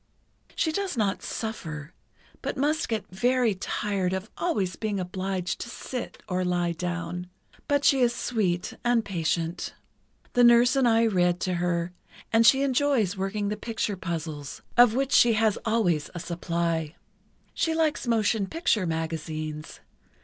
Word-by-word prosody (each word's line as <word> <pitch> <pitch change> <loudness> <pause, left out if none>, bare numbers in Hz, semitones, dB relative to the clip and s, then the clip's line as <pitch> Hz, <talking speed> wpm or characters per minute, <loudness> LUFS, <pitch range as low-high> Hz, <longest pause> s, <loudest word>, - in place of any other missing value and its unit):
"She 320 - +1
does 380 -4 -2
not 205 -3 0
suffer, 165 -9 -5 0.5
but - - -3
must 295 +2 +1
get 225 -2 -1
very 245 +3 +2
tired 190 -1 -2
of 190 +3 -4
always 205 - -1
being 210 -3 -2
obliged 185 0 -3
to - - -5
sit, 250 +1 -6
or 185 -2 0
lie 175 -1 +1
down. 175 +1 -4 0.4
But 285 -1 +2
she 270 - +5
is 245 -2 +4
sweet 190 -9 -1
and 240 -2 +2
patient. 165 -2 -2 0.6
The 245 - +4
nurse 240 +2 +6
and 265 -2 +4
I 225 0 +4
read 180 -4 +2
to 185 - 0
her, 175 0 -1 0.4
and 225 0 +6
she 270 +1 +6
enjoys 260 -7 +2
working 200 +2 -2
the 210 - -1
picture 220 -3 -2
puzzles, 160 -5 -5
of 240 -2 +6
which 270 +1 0
she 235 -1 +6
has 220 -1 +2
always 200 -10 +1
a - - -3
supply. 170 -2 -2 0.6
She 325 -1 0
likes 315 -5 0
motion 220 -3 +2
picture 225 - +1
magazines. 155 -1 -4
200 Hz, 150 wpm, -27 LUFS, 175-240 Hz, 0.6 s, nurse